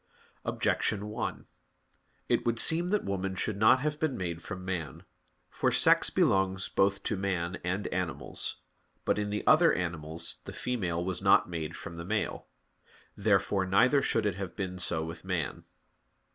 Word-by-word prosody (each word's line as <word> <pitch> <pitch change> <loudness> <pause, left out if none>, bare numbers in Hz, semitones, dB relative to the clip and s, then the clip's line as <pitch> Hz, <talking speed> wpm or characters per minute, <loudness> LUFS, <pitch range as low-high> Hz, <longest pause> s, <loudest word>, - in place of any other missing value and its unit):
Objection 105 0 0
1: 105 - -4 0.8
It - - +2
would 115 -1 0
seem 170 +2 +5
that 205 +2 +1
woman 95 -1 -2
should 100 +2 -2
not 110 +5 +5
have 150 +1 -2
been 155 -5 0
made 85 -3 -4
from 95 -2 -7
man. 85 -7 -4 0.5
For - - +1
sex - - +5
belongs 95 -1 +1
both 100 0 +1
to 110 - -1
man 95 -2 -2
and 95 +3 -2
animals. 90 -3 -3 0.5
But - - +1
in 105 0 -2
the 105 0 -3
other 165 +2 +6
animals 80 -2 -2
the - - -7
female 90 -9 -2
was 95 -1 -1
not 95 -2 +4
made 80 -1 -4
from 85 0 -8
the 85 - -5
male. 105 +3 -2 0.7
Therefore 100 -2 +1
neither 125 +9 +4
should 115 -5 +1
it 100 -3 0
have 95 -2 -5
been 90 -2 -4
so 80 -2 -1
with 80 +1 -8
man. 90 -7 -3
95 Hz, 160 wpm, -30 LUFS, 90-105 Hz, 0.8 s, other